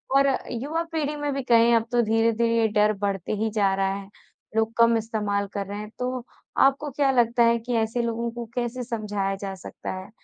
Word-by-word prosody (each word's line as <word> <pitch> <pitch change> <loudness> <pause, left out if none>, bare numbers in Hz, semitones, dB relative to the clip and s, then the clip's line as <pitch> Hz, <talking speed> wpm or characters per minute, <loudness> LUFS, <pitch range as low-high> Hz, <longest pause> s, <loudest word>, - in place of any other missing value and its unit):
और 275 0 +5 0.2
युवा 295 +8 -2
पीढ़ी 300 -2 -1
में 290 -1 -2
भी 275 - -2
कहें 235 -1 +5
अब 225 -1 +2
तो 240 -1 +3
धीरे-धीरे 230 +1 +2
ये 225 -1 +4
डर 210 0 +3
बढ़ते 195 -1 -2
ही 220 +2 0
जा 200 -3 +2
रहा 195 0 0
है, 200 0 -7 0.5
लोग 225 0 +1
कम 230 0 +5
इस्तेमाल 210 -2 -1
कर 200 -1 -2
रहे 205 +1 -5
हैं। 210 0 -7
तो 250 0 -2 0.4
आपको 275 +2 +1
क्या 275 0 +1
लगता 235 -1 +3
है 235 0 +4
कि 245 +2 -4
ऐसे 225 +2 0
लोगों 235 0 -2
को 240 0 -6
कैसे 245 +1 -2
समझाया 210 -4 -2
जा 195 0 -5
सकता 185 - -7
है? 185 +1 -7
230 Hz, 210 wpm, -25 LUFS, 210-245 Hz, 0.5 s, और